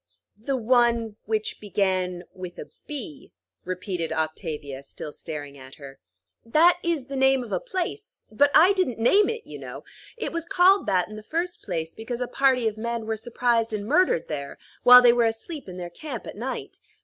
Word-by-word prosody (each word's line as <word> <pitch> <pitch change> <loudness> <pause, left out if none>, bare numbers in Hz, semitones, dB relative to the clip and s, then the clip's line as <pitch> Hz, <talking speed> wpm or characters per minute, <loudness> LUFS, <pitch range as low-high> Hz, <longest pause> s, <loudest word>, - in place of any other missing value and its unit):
"'The 250 +6 -2
one 235 -2 +2
which 215 0 -2
began 185 -3 -1
with 180 -1 -8
a - - -9 0.2
B,'" 260 - -6 0.3
repeated 180 -2 -3
Octavia, 155 -3 -3
still 145 +2 -9
staring 145 -3 -8
at 130 0 -12
her. 140 -2 -12 0.4
"That 330 +9 +4
is 330 -6 -1
the 275 +1 -7
name 265 -1 +3
of 235 - -10
a - - 0
place; 415 -3 -5
but 285 +7 +4
I 355 +6 +7
didn't 370 - 0
name 385 - +4
it, 460 0 -5
you - - -9
know. - - -8 0.3
It 460 - -3
was 335 0 -3
called 385 +1 +4
that, 180 -2 +2
in 215 - -9
the - - -8
first 340 +9 -3
place, 165 -4 -4
because 235 +2 -6
a 250 - -2
party 255 -2 +2
of 220 0 -3
men 235 0 -3
were 220 0 -1
surprised 230 0 0
and 205 -1 -3
murdered 295 - +2
there, 140 -2 -5 0.2
while 250 0 +9
they 240 -1 +7
were 240 -1 +3
asleep 225 - -4
in 180 - -8
their 175 -1 -6
camp 265 - -7
at - - -8
night. 245 +5 -5
230 Hz, 190 wpm, -25 LUFS, 180-275 Hz, 0.4 s, while